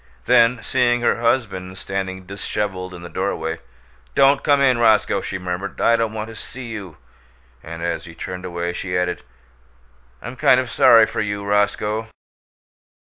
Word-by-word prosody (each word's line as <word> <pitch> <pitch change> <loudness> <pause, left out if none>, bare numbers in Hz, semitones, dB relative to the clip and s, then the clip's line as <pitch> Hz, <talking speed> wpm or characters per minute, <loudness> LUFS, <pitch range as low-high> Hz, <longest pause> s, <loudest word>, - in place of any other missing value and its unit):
Then, 120 -1 +4
seeing 120 -2 +1
her 120 - +1
husband 100 -7 -1
standing 95 0 -4
disheveled 95 -1 -4
in 85 - -10
the - - -7
doorway, 85 -3 -3 0.6
"Don't 135 +1 +4
come 145 -2 +4
in, 130 -3 +3
Roscoe," 110 -3 +3
she 95 - -4
murmured. 90 +2 -5
"I 115 - +4
don't 115 -1 0
want 110 0 -4
to 115 - -10
see 125 +2 -9
you." 100 -7 -8 0.6
And 85 +1 -8
as 85 - -2
he 85 -2 -11
turned 90 +1 -6
away 85 -1 -3
she 90 0 -3
added, 90 0 -1 1.0
"I'm 120 - -8
kind 130 - +5
of 125 -2 -3
sorry 115 -2 +7
for - - -3
you, 100 -1 -3
Roscoe." 105 +2 0
100 Hz, 160 wpm, -21 LUFS, 90-115 Hz, 1.0 s, sorry